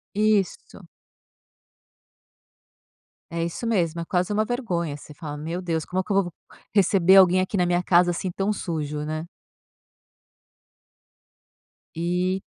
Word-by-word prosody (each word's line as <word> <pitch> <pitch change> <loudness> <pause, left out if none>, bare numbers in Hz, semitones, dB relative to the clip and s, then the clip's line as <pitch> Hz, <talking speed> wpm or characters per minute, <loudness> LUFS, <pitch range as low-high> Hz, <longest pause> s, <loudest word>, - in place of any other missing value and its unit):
Isso. 210 -3 0 2.5
É 170 0 -1
isso 170 +7 -5
mesmo, 170 -8 0
é - - -3
quase 180 +3 0
uma 215 +1 +2
vergonha, 180 - -2
você 150 +1 -13
fala: 150 -2 -7
"Meu 165 +5 -4
Deus, 165 -3 -2
como 185 +1 -2
é - - 0
que 205 - -18
eu 195 -1 +3
vou 175 - -7 0.4
receber 190 -2 +4
alguém 185 -1 +7
aqui 185 +2 -2
na 180 - +3
minha 175 0 +1
casa 175 0 +4
assim 175 +2 -2
tão 195 +3 0
sujo, 150 -6 -3
né?". 155 +1 -3 2.7
E, 180 +3 0
180 Hz, 135 wpm, -24 LUFS, 165-195 Hz, 2.7 s, alguém